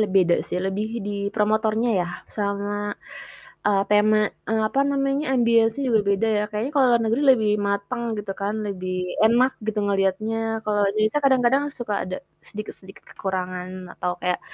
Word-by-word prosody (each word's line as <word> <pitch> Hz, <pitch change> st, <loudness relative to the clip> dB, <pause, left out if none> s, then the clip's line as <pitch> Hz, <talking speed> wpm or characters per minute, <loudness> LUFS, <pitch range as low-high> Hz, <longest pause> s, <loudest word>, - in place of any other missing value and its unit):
Le 215 Hz, -, +3 dB
beda 175 Hz, -2 st, +5 dB
sih -, -, -2 dB
lebih 205 Hz, +3 st, -2 dB, 0.2 s
di -, -, -2 dB, 0.2 s
promotornya 220 Hz, +2 st, +1 dB
ya 175 Hz, -, -1 dB, 0.3 s
sama, 200 Hz, -1 st, -2 dB, 0.9 s
eee, 200 Hz, -1 st, +3 dB
tema 210 Hz, +1 st, +4 dB, 0.5 s
apa 275 Hz, -, 0 dB
namanya 275 Hz, +1 st, 0 dB
ambience-nya 230 Hz, +1 st, +3 dB
juga 225 Hz, -3 st, +4 dB
beda 200 Hz, +3 st, +1 dB
ya -, -, +1 dB
kayaknya 215 Hz, +5 st, -2 dB
kalau 275 Hz, -3 st, +5 dB
luar 235 Hz, -1 st, +3 dB
negeri 230 Hz, +6 st, +1 dB
lebih 220 Hz, -5 st, +3 dB, 0.2 s
mateng 200 Hz, +5 st, -2 dB, 0.2 s
gitu 200 Hz, -1 st, -4 dB
kan, 205 Hz, +2 st, -1 dB
lebih 185 Hz, -2 st, -4 dB, 0.3 s
enak 245 Hz, +4 st, +4 dB
gitu 220 Hz, -1 st, -1 dB
ngeliatnya 200 Hz, +2 st, 0 dB, 0.3 s
kalau 205 Hz, -1 st, +1 dB
Indonesia 215 Hz, +7 st, +1 dB
kadang-kadang 265 Hz, 0 st, +4 dB, 0.2 s
suka 225 Hz, -4 st, -3 dB
ada 185 Hz, 0 st, -4 dB, 0.3 s
sedikit-sedikit 200 Hz, -2 st, -10 dB
kekurangan 185 Hz, -1 st, -4 dB, 0.2 s
atau 180 Hz, -, -2 dB
kayak 180 Hz, 0 st, -1 dB
215 Hz, 155 wpm, -23 LUFS, 200-235 Hz, 0.9 s, beda